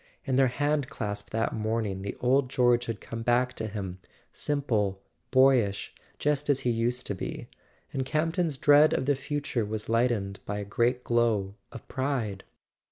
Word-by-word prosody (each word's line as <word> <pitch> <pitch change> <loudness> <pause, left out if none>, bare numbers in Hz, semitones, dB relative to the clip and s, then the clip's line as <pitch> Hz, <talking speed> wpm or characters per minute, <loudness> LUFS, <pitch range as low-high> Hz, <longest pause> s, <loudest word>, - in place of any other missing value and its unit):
In 130 - 0
their 135 -1 +4
hand¬ 145 +1 0
clasp 105 -2 -4
that 115 +1 -1
morning 110 -3 -1
the 100 - -5
old 130 +1 +2
George 120 -2 +3
had 115 -3 -3
come 115 +4 -6
back 120 +2 +2
to 110 - -4
him, 95 -3 -5 0.3
simple, 110 -10 0 0.3
boyish, 130 -7 +3 0.2
just 150 0 0
as 140 -2 +3
he 125 - +1
used 120 +2 0
to - - -2
be; 95 - -5 0.5
and 135 - 0
Camp 155 +4 0
ton's 165 -6 0
dread 145 +2 +6
of - - 0
the 145 - +3
future 145 -3 -2
was 105 +1 -4
lightened 115 -5 +1
by 105 - -4
a 100 - -4
great 120 +5 +1
glow 115 -5 +1 0.2
of 115 - -10
pride. 125 -8 -2
120 Hz, 170 wpm, -28 LUFS, 105-135 Hz, 0.5 s, dread